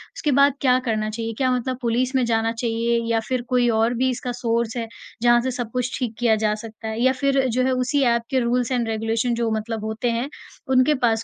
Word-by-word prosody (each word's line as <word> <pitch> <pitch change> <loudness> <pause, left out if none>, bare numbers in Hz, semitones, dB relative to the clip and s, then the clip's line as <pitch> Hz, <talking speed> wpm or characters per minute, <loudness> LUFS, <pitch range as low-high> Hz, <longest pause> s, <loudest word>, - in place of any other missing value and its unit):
उसके 300 -11 -1
बाद 280 +1 +5
क्या 255 -2 +4
करना 215 -2 -1
चाहिए? 225 +1 -4
क्या 260 -1 +1
मतलब 250 +1 -2
पुलिस 245 +2 0
में 260 - +3
जाना 225 -1 +1
चाहिए 230 0 0
या 225 - +2
फिर 255 -1 0
कोई 245 -1 +3
और 225 +1 +2
भी 255 +2 +1
इसका 250 0 -3
सोर्स 230 -1 0
है, 230 -1 -3 0.3
जहाँ 240 0 +5
से 260 +2 -2
सब 245 -2 -5
कुछ 250 0 -2
ठीक 235 -3 -3
किया 235 -2 +3
जा 210 - +2
सकता 225 0 -8
है 220 +1 -4
या 260 +1 +4
फिर 275 -1 +2
जो 255 +2 +1
है 260 - +2
उसी 255 +3 +1
ऐप 235 - +1
के 265 - +1
रूल्स 245 0 0
एंड 240 -3 0
रेगुलेशन 225 +2 -1
जो 230 -1 0
मतलब 220 0 -4
होते 220 +2 -1
हैं, 235 +4 -2 0.4
उनके 260 +3 +4
पास 225 -1 +1
240 Hz, 235 wpm, -22 LUFS, 225-255 Hz, 0.4 s, बाद